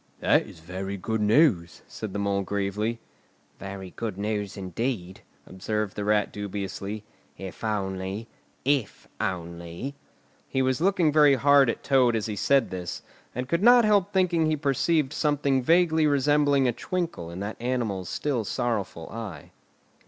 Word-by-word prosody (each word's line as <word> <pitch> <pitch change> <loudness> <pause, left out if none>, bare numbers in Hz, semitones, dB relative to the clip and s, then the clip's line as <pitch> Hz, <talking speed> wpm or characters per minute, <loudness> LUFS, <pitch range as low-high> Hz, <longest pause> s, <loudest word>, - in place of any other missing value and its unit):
"That - - +3
is 80 - -13
very 95 +4 -5
good 110 +3 -2
news," 105 - +3
said 110 -3 -6
the 105 - -4
Mole 100 -1 0
gravely. 100 +4 -2 0.6
"Very 95 -1 -7
good 110 -5 -5
news 105 -1 -3
indeed," 95 0 -3 0.2
observed 105 +2 -3
the 105 - -3
Rat 105 0 +1
dubiously, 100 +1 -5 0.3
"if 95 -1 -9
only—if 105 +5 -3
only——" 85 +6 -4 0.5
He 130 - 0
was 130 +2 0
looking 180 -4 +3
very 150 -2 +6
hard 140 -1 +5
at - - -3
Toad 130 -4 +3
as 110 - -1
he 105 - -3
said 135 +4 +2
this, 90 -2 -5 0.3
and 125 +1 -3
could 170 +5 0
not 240 +1 +7
help 205 -4 +3
thinking 175 -4 +2
he 155 0 +1
perceived 145 +1 +1
something 145 -3 +1
vaguely 160 +1 +4
resembling 145 -1 +3
a 120 - +1
twinkle 165 - -3
in 85 +2 -7
that 105 +3 -5
animal's 115 -8 -2
still 135 -6 -1
sorrowful 105 -8 -2
eye. 110 -6 -7
110 Hz, 145 wpm, -26 LUFS, 100-140 Hz, 0.6 s, not